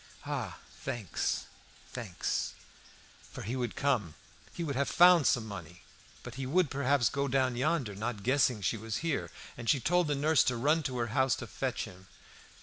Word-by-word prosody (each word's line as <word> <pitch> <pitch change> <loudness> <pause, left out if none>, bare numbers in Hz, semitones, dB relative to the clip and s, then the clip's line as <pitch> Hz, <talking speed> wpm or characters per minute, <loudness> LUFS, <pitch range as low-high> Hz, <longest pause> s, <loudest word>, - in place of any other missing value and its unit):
"Ah! - - -3 0.2
thanks, 110 -7 -2 0.5
thanks!" 110 -8 -2 0.8
For - - -7
he 115 +6 -3
would 120 -3 -2
come; 120 - 0 0.4
he 170 - -5
would 145 -4 -2
have 140 +1 +1
found 175 -3 +7
some 120 -5 +2
money. 90 -4 -9 0.4
But 125 - -8
he 130 - -3
would, 170 +1 +2
perhaps, 140 -2 +2
go 140 0 -1
down 130 -2 +1
yonder, 130 -3 0
not 105 0 -4
guessing 125 -3 +2
she 110 - +1
was 110 0 -4
here, 155 -4 -1 0.3
and 120 -1 -4
she 140 - +4
told 175 +6 +2
the 145 - +1
nurse 150 0 +4
to 125 - +1
run 150 +7 +3
to 125 - -4
her 120 -1 0
house 130 -2 +3
to - - -6
fetch - - -3
him. 95 +1 -13
130 Hz, 180 wpm, -31 LUFS, 115-140 Hz, 0.8 s, found